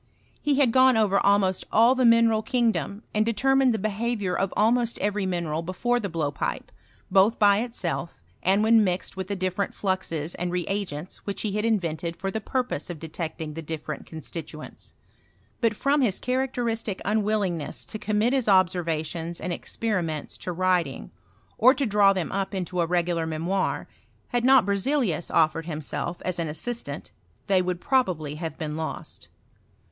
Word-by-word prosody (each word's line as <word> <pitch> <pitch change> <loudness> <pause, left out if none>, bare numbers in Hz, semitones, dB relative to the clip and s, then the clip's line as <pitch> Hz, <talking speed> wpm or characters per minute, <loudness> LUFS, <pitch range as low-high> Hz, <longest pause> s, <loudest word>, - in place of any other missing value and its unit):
He 290 -1 +2
had 270 -4 +4
gone 260 -1 +5
over 200 -3 +3
almost 200 -2 +2
all 230 +3 +6
the 260 -1 +2
mineral 230 -1 +5
kingdom, 220 - 0
and 215 - +3
detennined 260 +4 +3
the 220 - 0
behaviour 215 -1 -1
of 195 0 0
almost 235 +2 +2
every 205 -1 -1
mineral 170 -3 -2
before 215 +8 0
the 200 -4 -3
blowpipe, 150 -4 -3 0.4
both 195 +4 +4
by 205 -1 +5
itself 200 -8 -3 0.2
and 195 +3 +3
when 225 0 +5
mixed 185 -1 -1
Willi 190 -1 -4
the 200 - -2
different 185 +1 -2
fluxes 175 -5 -2
and 175 0 -3
reagents 180 -2 -3
which 200 - -3
he 215 - -1
had 210 +2 -1
invented 170 -6 -1
for 195 +1 -3
the 220 - -3
parpose 250 - -2
of 175 - -5
detecting 160 -1 -5
the 165 - -6
drfierent 155 -2 -6
constituents; 160 0 -8 0.6
but. 230 -3 +1
from 280 +6 +2
hi* 245 - +4
characteristic 240 -2 -2
nnwtlltng' 210 -2 +1
ness 145 -3 -4
to 215 - -6
commit 215 +4 +1
his 265 -4 +1
observationB 170 -3 +1
and 180 - -3
experiments 170 -8 -2
to 180 - -4
writing, 175 - 0 0.5
or 255 +4 +7
to 275 +1 0
draw 205 -2 +5
thera 185 -4 -2
up 195 +1 -2
into 180 -1 -2
a 165 - +1
regular 170 -1 0
memoir, 170 +5 -1 0.4
had 245 -1 0
not 260 -4 +6
Berxebus 200 - 0
offered 165 0 +2
himself 160 +2 -4
as 180 -1 -2
an 165 - -1
assistant, 235 +10 -4 0.4
tbey 190 -2 +4
would 180 -1 -2
probably 180 - 0
have 160 0 -5
been 155 -2 -4
lost. 160 0 -5
195 Hz, 160 wpm, -26 LUFS, 170-225 Hz, 0.6 s, or